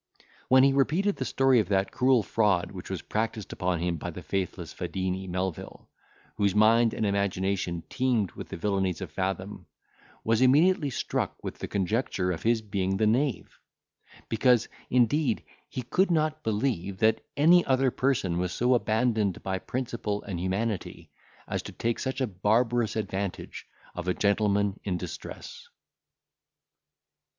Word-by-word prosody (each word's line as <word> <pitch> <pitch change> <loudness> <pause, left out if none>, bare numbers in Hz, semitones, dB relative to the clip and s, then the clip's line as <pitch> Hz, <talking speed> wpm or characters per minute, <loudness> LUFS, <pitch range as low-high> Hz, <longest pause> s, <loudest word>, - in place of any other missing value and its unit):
When 130 +1 +6
he 135 0 +5
repeated 165 +9 +1
the 130 - -2
story 135 -2 +3
of 100 -4 -1
that 95 -1 +1
cruel 130 -3 +3
fraud 95 -4 +1
which 95 -2 -9
was 95 -2 -4
practised 110 -1 -3
upon 90 -1 -1
him 85 -1 -1
by - - -5
the - - -8
faithless 90 -4 -3
Fadini, 95 0 -3
Melvil, 90 -1 -5 0.5
whose 100 -1 +1
mind 115 +2 +4
and 110 - -1
imagination 95 -3 -1
teemed 120 -8 0
with - - -9
the - - -6
villanies 95 -1 -1
of 90 -5 -6
Fathom, 95 -1 -4 0.6
was 115 +1 +2
immediately 150 +4 +4
struck 130 - -2
with - - -6
the - - -4
conjecture 100 -2 -1
of 85 - -4
his 115 -1 +1
being 95 -2 -1
the 110 - +2
knave; 125 +5 0 0.7
because, 120 +1 +3 0.2
indeed, 125 +1 +2 0.3
he 130 - -5
could 185 - +1
not 155 -2 +1
believe 105 - -1
that 110 +2 +2
any 170 +4 +6
other 130 -1 +2
person 115 -12 0
was 90 0 -1
so 125 +6 +2
abandoned 110 -4 +1
by 95 -1 -2
principle 115 -4 -3
and 95 -4 -5
humanity 95 +2 -3 0.4
as - - -2
to - - -8
take 115 0 -2
such 130 0 -3
a 130 - +2
barbarous 110 +3 +1
advantage 100 -3 -4 0.3
of 90 - -6
a 90 - +1
gentleman 100 -1 +1
in 95 -3 -1
distress. - - -8
105 Hz, 150 wpm, -27 LUFS, 95-125 Hz, 0.7 s, When